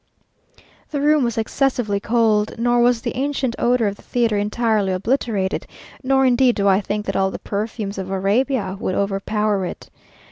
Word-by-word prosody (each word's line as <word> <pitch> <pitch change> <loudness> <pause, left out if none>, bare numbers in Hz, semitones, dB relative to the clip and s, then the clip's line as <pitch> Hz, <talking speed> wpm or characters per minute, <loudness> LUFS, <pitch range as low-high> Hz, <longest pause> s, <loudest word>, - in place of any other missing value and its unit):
The 290 - -3
room 300 0 +3
was 235 -1 -1
excessively 225 -3 0
cold, 220 -1 +1
nor 240 +1 +2
was 240 -1 +2
the - - -3
ancient 265 -2 -1
odour 240 -1 +2
of 200 0 -2
the - - -16
theatre 235 -3 0
entirely 210 -2 0
obliterated; 205 -1 -1 0.3
nor 270 0 +2
indeed 250 -1 +4
do 200 -2 +1
I 195 +1 +4
think 210 +1 -3
that - - -3
all 190 0 +2
the - - -6
perfumes 205 -1 -4
of 190 0 -5
Arabia 200 +2 0
would 185 - -2
overpower 200 +1 0
it. 180 - -7
220 Hz, 170 wpm, -21 LUFS, 200-245 Hz, 0.3 s, indeed